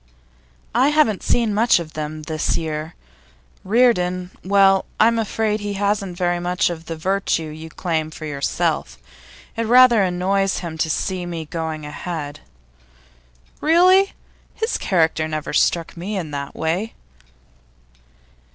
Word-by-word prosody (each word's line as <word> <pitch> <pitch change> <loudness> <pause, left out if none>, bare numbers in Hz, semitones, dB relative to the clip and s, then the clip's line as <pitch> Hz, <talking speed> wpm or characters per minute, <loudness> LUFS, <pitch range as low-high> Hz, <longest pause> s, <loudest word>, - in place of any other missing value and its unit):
'I 250 +4 +4
haven't 295 -10 +2
seen 230 -3 +1
much 230 +4 +4
of 155 -2 -8
them 155 0 -5
this 155 0 -1
year. 155 0 -4 0.7
Reardon 185 -5 +2
well, 195 0 +4
I'm 230 +1 +4
afraid 220 0 -1
he 205 -1 -4
hasn't 200 -2 -1
very 175 -1 0
much 175 0 0
of 165 -1 -8
the 165 - -4
virtue 165 -2 -1
you 160 +1 -9
claim 160 -2 -2
for 155 0 -9
yourself. 140 - -2 0.6
It 230 0 -2
rather 245 -2 +7
annoys 190 +1 +1
him 170 -3 -5
to 160 - 0
see 180 +2 -2
me 165 -2 -5
going 160 -1 -4
ahead.' 150 -1 -6 1.2
'Really? 365 +5 +5 0.4
His 445 +1 -2
character 160 -4 +1
never 155 -1 -4
struck 165 +2 +1
me 195 +5 -4
in 165 -5 -4
that 140 -1 -5
way. 175 +8 -2
180 Hz, 135 wpm, -21 LUFS, 160-210 Hz, 1.2 s, rather